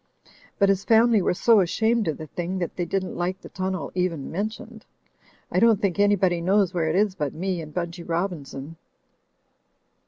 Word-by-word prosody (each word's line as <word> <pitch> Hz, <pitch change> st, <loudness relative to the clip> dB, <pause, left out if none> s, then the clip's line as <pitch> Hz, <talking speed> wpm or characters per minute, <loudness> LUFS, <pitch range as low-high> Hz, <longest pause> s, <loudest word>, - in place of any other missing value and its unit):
But 200 Hz, -, +3 dB
his 195 Hz, 0 st, +1 dB
family 225 Hz, -1 st, +4 dB
were 180 Hz, -, +1 dB
so 220 Hz, +3 st, +5 dB
ashamed 220 Hz, +4 st, +1 dB
of 155 Hz, -, -1 dB
the 155 Hz, -, -7 dB
thing, 175 Hz, +4 st, -4 dB
that 175 Hz, -2 st, -3 dB
they 175 Hz, -, -2 dB
didn't 185 Hz, +2 st, -2 dB
like 180 Hz, +2 st, -2 dB
the -, -, -13 dB
ttmnel 185 Hz, -6 st, -3 dB
even 180 Hz, -6 st, -2 dB
mentioned. 215 Hz, +4 st, -5 dB, 0.7 s
I -, -, +2 dB
don't 225 Hz, -3 st, +5 dB
think 200 Hz, -3 st, -1 dB
anybody 195 Hz, -4 st, +3 dB
knows 190 Hz, +1 st, +2 dB
where 170 Hz, -3 st, 0 dB
it 160 Hz, -, 0 dB
is 205 Hz, 0 st, +2 dB
but 150 Hz, -7 st, -3 dB
me 185 Hz, 0 st, -2 dB
and 155 Hz, -1 st, -9 dB
Btmchy 170 Hz, 0 st, -5 dB
Robin 170 Hz, -2 st, -1 dB
son. 140 Hz, +4 st, -9 dB
185 Hz, 185 wpm, -24 LUFS, 170-200 Hz, 0.7 s, so